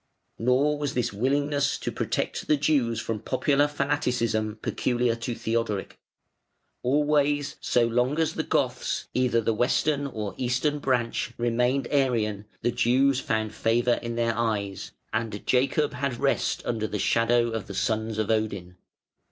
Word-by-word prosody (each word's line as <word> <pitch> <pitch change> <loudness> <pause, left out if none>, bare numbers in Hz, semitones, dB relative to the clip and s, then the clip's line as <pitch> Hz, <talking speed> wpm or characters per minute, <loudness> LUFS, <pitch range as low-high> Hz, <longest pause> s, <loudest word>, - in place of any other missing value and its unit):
Nor 135 +5 +2
was 145 -2 -2
this 125 -4 0
willingness 140 +6 +1
to - - -4
protect - - -2
the 150 - +4
Jews 140 -6 +1
from 110 -1 -3
popular 140 +5 +2
fanaticism 125 -7 -1
peculiar 120 -1 0
to 115 +1 -4
Theodoric. 110 -4 -2 0.8
Always, 145 +1 +1
so 120 -1 +2
long 125 +5 +1
as 160 -1 +1
the - - -1
Goths, - - -1
either 125 -2 +2
the 115 +1 +1
Western 140 +5 +1
or 105 -6 -5
Eastern 130 +4 0
branch, 125 -4 -1
remained 125 +2 +1
Arian, 115 -7 +1 0.2
the 120 - +2
Jews 125 +3 +3
found 110 -3 -1
favour 120 +2 +2
in 120 -1 -4
their 115 -1 0
eyes, 105 -4 -2 0.2
and 110 -3 -3
Jacob 135 +4 +2
had 130 -1 -2
rest - - 0
under 110 -2 -1
the 105 - -3
shadow 115 +3 +2
of 110 -4 -4
the 100 - -7
sons 110 +1 -1
of 110 0 0
Odin. 100 -5 -2
120 Hz, 145 wpm, -26 LUFS, 110-140 Hz, 0.8 s, the